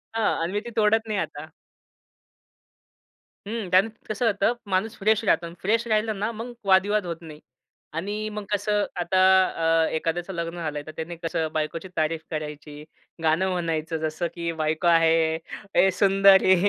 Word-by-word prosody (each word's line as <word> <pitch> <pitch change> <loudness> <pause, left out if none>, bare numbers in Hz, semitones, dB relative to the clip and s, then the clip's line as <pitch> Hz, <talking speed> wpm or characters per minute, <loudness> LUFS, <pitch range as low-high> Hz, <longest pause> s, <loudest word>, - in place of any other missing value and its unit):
हां. 220 -7 +1
आणि 170 +3 -2
मी 205 - +1
ती - - -5
तोडत 220 +1 +3
नाही 210 -2 -1
आता. 150 -2 -5 2.0
हं. 220 -3 -4
त्याने 185 +4 +5
त 220 - -25
कसं 215 +3 -1
होतं 210 +1 +2 0.2
माणूस 195 +4 0
फ्रेश 220 +2 +2
राहतो 170 -4 +2
आणि 170 0 -9
फ्रेश 225 +4 +1
राहिलं 215 -1 0
ना, 210 +3 -1
मग 230 +2 -7
वादविवाद 195 +2 +3
होत 170 -1 -3
नाही. 155 -2 -11 0.5
आणि 205 +6 -3
मग 210 0 -5
कसं 205 0 +1
आता 175 +2 +1 0.7
अ, - - 0
एखाद्याचं 170 +4 -2
लग्न 170 0 -4
झालंय, 155 -3 -3
तर - - -6
त्याने 160 +2 -5
कसं 165 -1 -2
बायकोची 155 +3 -3
तारीफ 155 +1 0
करायची, 150 -1 -6 0.4
गाणं 165 +4 +2
म्हणायचं 165 -2 -2
जसं 155 +2 -2
की 170 -1 -2
बायको 155 +3 0
आहे 165 -1 +4 0.4
ए 195 - +6
सुंदरी 195 -1 +6
180 Hz, 160 wpm, -25 LUFS, 160-210 Hz, 2.0 s, ए